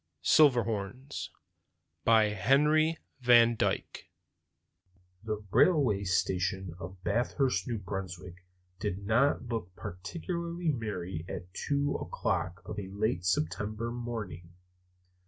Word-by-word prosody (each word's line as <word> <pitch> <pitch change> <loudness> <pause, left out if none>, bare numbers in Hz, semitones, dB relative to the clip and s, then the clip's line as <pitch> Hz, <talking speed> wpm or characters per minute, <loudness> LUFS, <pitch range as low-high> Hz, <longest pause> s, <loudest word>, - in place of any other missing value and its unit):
Silverhorns 125 -2 +2 0.7
By 110 -2 +5
Henry 150 - +3 0.2
van 120 -2 +6
Dyke - - -2 1.1
THE 105 -1 -4
railway 120 - +4
station 95 -1 0
of 95 0 -9
Bathurst, 120 -1 0
New 120 -2 -1
Brunswick, 95 -2 -6 0.4
did 100 0 -3
not 120 +6 +3
look 110 -7 -4
particularly 170 - -4
merry 95 - -3
at 90 -1 -7
two 145 0 0
o'clock 90 +3 -2
of 105 - -5
a 95 - -5
late 100 -2 -1
September 105 +6 -1
morning. 105 -8 -6
105 Hz, 100 wpm, -30 LUFS, 95-125 Hz, 1.1 s, van